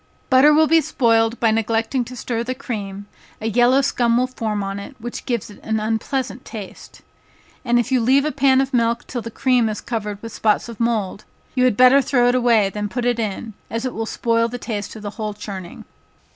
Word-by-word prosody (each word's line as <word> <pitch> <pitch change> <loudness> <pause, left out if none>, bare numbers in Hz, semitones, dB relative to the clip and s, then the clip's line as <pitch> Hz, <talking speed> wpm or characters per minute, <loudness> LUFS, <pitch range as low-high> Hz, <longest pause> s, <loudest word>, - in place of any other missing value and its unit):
Butter 265 +3 +7
will 310 +1 +5
be 325 +1 +4
spoiled 230 -4 +1
by 225 -2 +3
neglecting 225 +3 0
to 255 - -9
stir 235 -1 -3
the 255 +2 -3
cream, 205 -7 -6 0.3
a 220 - -7
yellow 245 +4 +4
scum 240 -3 +2
will 250 - +3
form 220 -5 -3
on 195 0 -4
it, 200 +7 -9
which 240 +1 -7
gives 235 -4 -2
it 205 - -14
an 220 0 -1
unpleasant 235 +4 -2
taste. 210 -5 -10 0.6
And 240 -1 +2
if 240 +2 0
you 255 -2 +3
leave 265 +5 +3
a 305 - 0
pan 265 -1 +3
of 270 0 -3
milk 235 -1 +1
till 245 - -5
the 230 - -6
cream 245 -1 +2
is 210 - -4
covered 210 -4 -4
with 230 -1 -7
spots 215 +1 +1
of 235 -2 -9
mould, 220 -4 -1 0.3
you 255 -1 +2
had 245 -5 +2
better 255 +2 +7
throw 245 -2 +2
it - - +2
away 235 -5 +3
than 210 0 -4
put 245 +3 -3
it 240 -1 +1
in, 220 +1 -4 0.2
as 230 +2 -3
it 255 - -3
will 225 0 -3
spoil 230 0 +1
the 245 +1 -6
taste 215 -4 -5
of 215 -1 -9
a 205 - -4
whole 210 0 -5
churning. 195 -4 -8
230 Hz, 220 wpm, -21 LUFS, 215-255 Hz, 0.6 s, Butter